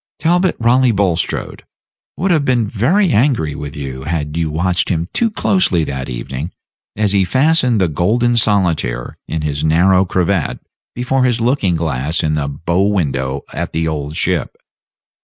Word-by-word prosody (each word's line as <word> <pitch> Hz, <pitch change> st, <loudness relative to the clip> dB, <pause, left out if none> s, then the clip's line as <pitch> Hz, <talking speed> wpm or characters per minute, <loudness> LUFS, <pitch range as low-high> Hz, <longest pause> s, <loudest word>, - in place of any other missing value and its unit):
Talbot 175 Hz, +3 st, +2 dB
Raleigh 125 Hz, +2 st, +3 dB
Bulstrode 95 Hz, -5 st, -1 dB, 0.6 s
would 190 Hz, +3 st, 0 dB
have 155 Hz, -4 st, +3 dB
been 125 Hz, -5 st, +1 dB
very 165 Hz, -, +2 dB
angry 110 Hz, -, +2 dB
with 70 Hz, +1 st, -7 dB
you 65 Hz, -2 st, -6 dB
had 75 Hz, -2 st, -3 dB
you 80 Hz, -1 st, -1 dB
watched 85 Hz, +3 st, 0 dB
him 85 Hz, -2 st, -1 dB
too 230 Hz, -, +1 dB
closely 185 Hz, -, +1 dB
that 65 Hz, -3 st, -4 dB
evening 65 Hz, +6 st, -5 dB, 0.4 s
as 105 Hz, -1 st, +1 dB
he 100 Hz, -1 st, +3 dB
fastened 130 Hz, -, +2 dB
the 95 Hz, -, +3 dB
golden 110 Hz, +10 st, +1 dB
solitaire 95 Hz, -, 0 dB
in 80 Hz, -1 st, -3 dB
his 75 Hz, -1 st, -2 dB
narrow 90 Hz, +4 st, +4 dB
cravat 90 Hz, -2 st, -1 dB, 0.4 s
before 125 Hz, +2 st, 0 dB
his 125 Hz, -2 st, +1 dB
looking 115 Hz, -7 st, +1 dB
glass 80 Hz, -1 st, -1 dB
in 75 Hz, -1 st, 0 dB
the 75 Hz, -2 st, -1 dB
bow 85 Hz, +6 st, -1 dB
window 70 Hz, -8 st, -1 dB
at -, -, -4 dB
the 80 Hz, 0 st, 0 dB
Old 75 Hz, -1 st, -4 dB
Ship. -, -, -1 dB
90 Hz, 155 wpm, -17 LUFS, 75-120 Hz, 0.6 s, narrow